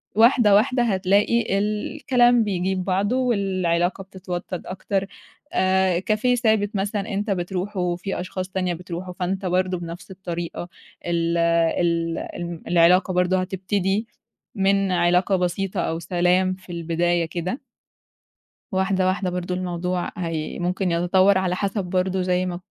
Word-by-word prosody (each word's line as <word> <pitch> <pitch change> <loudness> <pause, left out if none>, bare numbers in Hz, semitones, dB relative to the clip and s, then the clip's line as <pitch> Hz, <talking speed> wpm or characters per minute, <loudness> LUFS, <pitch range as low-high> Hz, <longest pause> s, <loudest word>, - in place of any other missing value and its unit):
واحدة، 225 -2 +5
واحدة 245 +4 +3
هتلاقي 200 +1 +2
الكلام 240 +3 +2
بيجيب 190 -2 -1
بعضه 195 +5 +1
والعلاقة 190 -7 0
بتتوطّد 185 -2 -6
أكتر. 195 +1 -2 0.5
آآ 185 -1 +2
كافيه 215 +6 +1
ثابت 220 -3 +1
مثلًا 205 +2 -2
أنت 205 +2 -1
بتروحه 180 0 -2
في 190 +2 -4
أشخاص 185 +1 -5
تانية 185 -2 -1
بتروحه، 180 +1 -6
فأنت 190 +2 -3
برضه 185 0 0
بنَفْس 170 +3 -8
الطريقة 175 -2 -5 0.4
ال 170 0 0
ال 170 0 +1 0.2
الم 170 -1 -6
العلاقة 180 +2 +4
برضه 180 +1 +2
هتبتدي 195 +3 -1 0.5
من 195 -1 +2
علاقة 180 +2 +3
بسيطة 180 +2 -1
أو 165 0 -2
سلام 180 +2 +2
في 185 -1 -13
البداية 170 0 0
كده. 180 - -4 1.1
واحدة، 190 0 +1
واحدة 185 0 0
برضه 180 0 -3
الموضوع 180 0 -2
هي 165 -3 -3
ممكن 180 +1 -1
يتطوّر 185 +3 +3
على 180 -1 0
حسَب 200 0 -1
برضه 185 +1 0
زي 180 0 +1
ما 180 -1 -3
ك 175 - -9
185 Hz, 130 wpm, -23 LUFS, 175-195 Hz, 1.1 s, واحدة